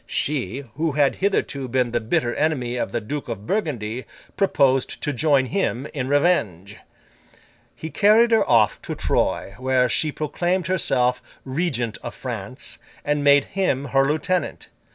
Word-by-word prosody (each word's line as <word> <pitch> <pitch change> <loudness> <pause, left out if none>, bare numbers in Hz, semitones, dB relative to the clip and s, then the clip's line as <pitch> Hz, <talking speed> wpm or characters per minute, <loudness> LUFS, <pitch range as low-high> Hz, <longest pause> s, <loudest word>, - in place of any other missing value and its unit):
She, 140 -3 -2
who 160 -1 0
had 140 -1 +2
hitherto 145 -9 0
been 125 -1 0
the 120 - +1
bitter 120 +2 0
enemy 130 -6 0
of 120 - -2
the 120 - -1
Duke 140 +5 -5
of 105 -3 -5
Burgundy, 125 - -2 0.3
proposed 135 -9 +2
to 150 - -1
join 140 0 +3
him, 135 -5 -1
in 130 -3 -3
revenge. 110 - +1 1.0
He 160 - -7
carried 220 +3 +5
her 225 - +5
off 115 -3 +3
to - - -5
Troyes, 100 +1 -1
where 130 -1 +2
she 150 +5 0
proclaimed 175 +5 -1
herself 130 -8 +1 0.2
Regent 130 -5 -2
of - - -7
France, - - -6 0.3
and 150 0 0
made 140 -1 +5
him 180 -8 -1
her 135 +1 +3
lieutenant. 155 +6 -1
140 Hz, 150 wpm, -23 LUFS, 125-160 Hz, 1.0 s, carried